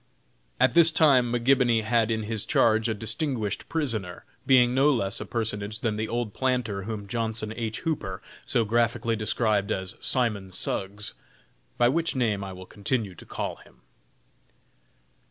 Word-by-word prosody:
At - - +4
this 170 -1 +8
time 135 -7 +4
McGibony 120 -2 +3
had 115 0 +2
in 110 -1 -1
his 110 -1 -3
charge 110 0 +2
a 110 - -1
distinguished 110 -1 -2
prisoner, 110 - -2 0.2
being 125 -2 +5
no 135 +3 +4
less 100 -6 -1
a 110 - -6
personage 110 -2 -2
than 110 -3 0
the 110 +1 -2
old 120 -2 -3
planter 125 -7 -1
whom 105 -2 -5
Johnson 110 0 -3
H. 110 -2 -4
Hooper 140 - -3 0.2
so 115 -2 +1
graphically 115 +1 +1
described 110 -2 0
as 95 0 -3
"Simon 110 -7 0
Suggs;" 100 +2 -2 0.6
by 120 - +4
which 165 +5 0
name 110 -6 0
I 95 - -6
will 95 0 -10
continue 105 0 -3
to - - -14
call - - -4
him. - - -20
110 Hz, 155 wpm, -26 LUFS, 105-120 Hz, 0.6 s, this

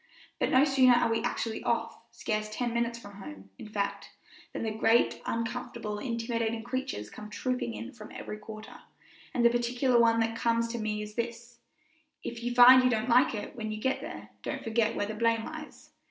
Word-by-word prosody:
But - - +1
no 260 +2 +5
sooner 265 -3 +5
are 235 -1 +2
we 225 - +1
actually 225 -1 -2
off, 230 -1 -1
scarce 215 -2 -3
ten 235 +2 -2
minutes 235 0 0
from 205 -3 -12
home, 100 - -10
in 215 - -9
fact, 200 -1 -3 0.4
than - - -4
the 220 - -1
great, 225 +2 +2
uncomfortable, 230 -2 -3
intimidating 230 -1 -2
creatures 245 - -4
come 210 0 -9
trooping 250 +1 -2
in 245 - -7
from 215 -5 -12
every 210 - -7
quarter, 215 0 -10 0.5
and 240 - +1
the 235 - +7
particular 240 +1 +2
one 230 -1 +4
that 225 0 0
comes 230 0 +1
to 235 0 -4
me 210 -1 -2
is 210 0 -9
this, 235 +1 -5 0.6
If 235 0 -5
you 240 0 -2
find 255 +1 +9
you 255 - +4
don't 225 0 0
like 245 0 +5
it 205 - -6
when 220 -2 -4
you 215 - -4
get 265 +3 0
there, 315 +5 -8
don't - - -4
forget 225 -1 +1
where - - 0
the 215 - -5
blame 230 +1 +1
lies. 315 -1 -9
230 Hz, 200 wpm, -29 LUFS, 215-245 Hz, 0.6 s, find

